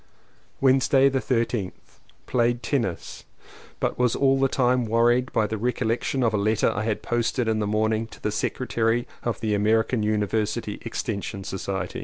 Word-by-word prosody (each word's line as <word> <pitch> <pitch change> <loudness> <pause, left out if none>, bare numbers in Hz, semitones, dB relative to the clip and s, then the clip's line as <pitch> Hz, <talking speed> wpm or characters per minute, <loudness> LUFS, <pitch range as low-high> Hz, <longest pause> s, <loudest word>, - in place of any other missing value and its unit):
Wednesday 135 +1 +4
the 135 0 0
13th. 115 -6 -3 0.3
Played 120 0 +1
tennis, 115 - -2 0.6
but - - -2
was 125 -2 +2
all 135 -1 +3
the 135 - +4
time 125 -2 +1
wor 115 +2 +3
ried 125 +1 +1
by 110 - +2
the 110 0 -3
recollection 125 +2 -1
of 115 -2 +2
a - - +2
letter 105 +1 +2
I 105 +2 -3
had 110 -2 -2
post 120 +1 -1
ed 120 - +1
in 110 -1 +1
the 105 - -1
morning 110 +1 0
to - - -14
the 105 - -2
secretary 115 +1 -1
of 120 - -2
the 110 -2 0
American 110 +3 +2
University 105 +1 -1
Extension 100 -3 -4
Society. 95 -1 -4
115 Hz, 170 wpm, -25 LUFS, 105-125 Hz, 0.6 s, Wednesday